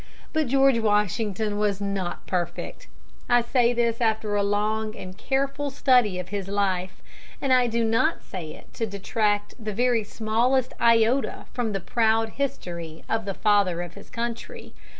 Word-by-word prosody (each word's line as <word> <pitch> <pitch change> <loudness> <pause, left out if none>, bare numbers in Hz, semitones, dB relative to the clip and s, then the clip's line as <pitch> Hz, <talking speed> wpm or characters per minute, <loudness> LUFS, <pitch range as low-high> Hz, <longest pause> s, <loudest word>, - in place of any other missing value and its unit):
But 310 -3 +1
George 270 -1 +4
Washington 210 0 0
was 205 -2 +1
not 195 -3 -3
perfect. 175 -2 -4 0.4
I 245 0 +5
say 240 0 +3
this 235 -1 0
after 220 -2 +1
a 205 - +2
long 215 +2 0
and 185 0 -8
careful 275 +5 -1
study 250 -8 +3
of 180 0 -5
his 200 -1 -4
life, 190 -2 -1 0.4
and 270 -2 +2
I 250 -1 +4
do 230 0 0
not 230 +8 +1
say 170 -5 -7
it - - -17
to 225 - -2
detract 205 +2 -1
the 215 -1 -3
very 240 -1 +2
smallest 235 +5 0
iota 230 +3 +3
from 235 -4 -1
the 195 - -1
proud 225 +3 +1
history 170 - -5
of 225 -1 -1
the 195 -2 -3
Father 200 -5 +2
of 175 -1 -9
his 200 - -13
Country. 235 -1 -5
220 Hz, 160 wpm, -25 LUFS, 200-240 Hz, 0.4 s, I